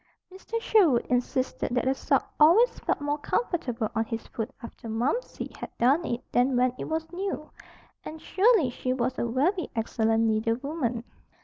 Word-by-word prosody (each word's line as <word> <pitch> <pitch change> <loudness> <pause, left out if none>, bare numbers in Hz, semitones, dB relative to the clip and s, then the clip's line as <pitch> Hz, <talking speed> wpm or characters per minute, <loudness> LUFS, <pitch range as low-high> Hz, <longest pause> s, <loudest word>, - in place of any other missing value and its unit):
Mr. 450 +4 -4
Sherwood 365 - +3
insisted 250 0 -1
that 250 - +1
a 265 - +3
sock 270 - 0
always 355 +12 +5
felt - - -1
more 290 +1 -1
comfortable 260 - -1
on 225 0 +1
his 225 0 -5
foot 225 +1 -5
after 230 0 -9
"Momsey" 250 - -2
had - - -6
darned 275 +8 +3
it 240 +1 -2
than 250 +1 +2
when 250 0 +3
it - - -3
was 320 0 -3
new. 375 -4 -4 0.5
And 315 - -8
surely 385 - +3
she 255 +1 -2
was 255 0 -1
a 235 - 0
very 310 - 0
excellent 225 0 +1
needlewoman. 230 +3 -1
260 Hz, 165 wpm, -27 LUFS, 235-320 Hz, 0.5 s, always